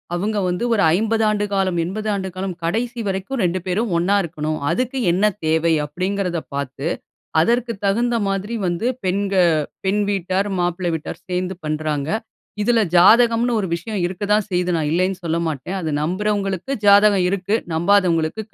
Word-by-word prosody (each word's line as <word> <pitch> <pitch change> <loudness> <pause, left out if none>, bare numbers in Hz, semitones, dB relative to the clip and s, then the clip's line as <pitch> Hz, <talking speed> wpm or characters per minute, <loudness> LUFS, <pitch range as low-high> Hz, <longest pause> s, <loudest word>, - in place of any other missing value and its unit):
அவங்க 210 +4 -1
வந்து 180 +4 -1
ஒரு 210 - +2 0.2
50 225 +1 +1
ஆண்டு 210 -1 +1
காலம், 190 -3 +1
80 210 +5 -4
ஆண்டு 190 -1 -3
காலம் 185 -1 -4
கடைசி 235 +8 -1
வரைக்கும் 195 +6 -2
2 180 +1 +1
பேரும் 195 +4 -1
ஒண்ணா 180 +4 +2
இருக்கணும். 155 -2 -3
அதுக்கு 255 +1 -1
என்ன 185 +4 0 0.2
தேவை 160 +1 +2
அப்டிங்கறத 185 +3 -2
பார்த்து, 140 +1 -4 0.5
அதற்கு 235 +7 +1
தகுந்த 235 +4 +1
மாதிரி 195 +3 -2
வந்து 175 +6 -1 0.2
பெண் 195 +2 0 0.5
பெண் 205 +2 +2
வீட்டார், 195 +1 -1
மாப்பிள்ளை 175 0 -1
வீட்டார் 160 - -6
சேர்ந்து 180 0 -2
பண்ணுகிறாங்க. 150 -1 -2 0.6
இதில 235 0 +3 0.2
ஜாதகம்ன்னு 230 +5 +5
ஒரு 195 - -2
விஷயம் 200 +4 -4
இருக்க 190 +3 -5
தான் 210 -1 +1
செய்து 180 0 0
நான் 155 -2 -1
இல்லைன்னு 185 +2 0
சொல்ல 165 0 0
மாட்டேன். 160 +5 -3
அதை 160 - -3
நம்புகிறவர்களுக்கு 195 - -1
ஜாதகம் 200 -2 +6
இருக்கு. 200 +2 0 0.2
நம்பாதவர்களுக்கு 175 0 +2
190 Hz, 150 wpm, -20 LUFS, 170-210 Hz, 0.6 s, ஜாதகம்